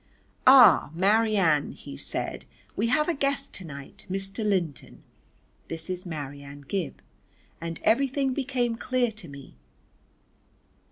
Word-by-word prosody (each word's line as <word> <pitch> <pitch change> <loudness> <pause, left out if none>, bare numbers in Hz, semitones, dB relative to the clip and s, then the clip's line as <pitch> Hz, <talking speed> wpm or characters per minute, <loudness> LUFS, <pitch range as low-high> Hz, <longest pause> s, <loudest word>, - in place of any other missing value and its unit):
"Ah, 260 - +8
Marianne," 195 -5 +3
he - - -10
said, - - -4 0.3
"we 220 - 0
have 300 +5 +2
a 345 - +2
guest 275 -1 -1
to 190 - -8
night. 140 -4 -11
Mr. 195 +3 -4
Linton. 180 - -2 0.6
This 165 +2 -5
is 180 0 -4
Marianne 145 -2 -7
Gib." 190 -5 -3 0.6
And 165 -1 -5
everything 270 +2 +2
became 250 -4 -1
clear 245 -1 0
to 215 -5 -10
me. 140 -2 -12
195 Hz, 120 wpm, -27 LUFS, 160-250 Hz, 0.6 s, Ah